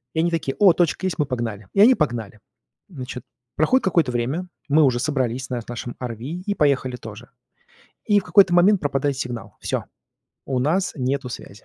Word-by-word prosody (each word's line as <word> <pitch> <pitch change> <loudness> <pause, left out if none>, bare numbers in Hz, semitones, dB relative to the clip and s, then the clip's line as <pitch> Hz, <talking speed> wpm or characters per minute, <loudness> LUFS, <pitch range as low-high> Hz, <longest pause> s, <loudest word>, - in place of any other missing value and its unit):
И - - 0
они 170 +1 +2
такое: 145 -5 -2
"О, 195 -4 +7
точка 175 +2 0
есть- 185 -4 -2
мы 150 - +2
погнали" 115 -6 -4
И - - -1
они 240 +5 +8
погнали. 120 - -2 0.5
Значит, 130 -6 -7 0.3
проходит 255 - +2
какое-то 170 -8 +2
время, 135 +10 -2 0.2
мы 155 +2 +5
уже 130 -4 +3
собрались 130 -2 -1
на 125 -2 -2
нашем 120 0 -6
RV 120 -3 -4
и 180 - -4
поехали 140 -5 +1
тоже. 115 0 -10 0.8
И 205 -1 +4
в - - -9
какой-то 190 -3 +5
момент 185 +3 +5
пропадает 140 -2 -1
сигнал, 120 -3 -6
всё, - - -2 0.6
у 130 -2 -1
нас 165 +9 0
нету 135 0 -2
связи. 105 -4 -10
140 Hz, 180 wpm, -22 LUFS, 125-175 Hz, 0.8 s, они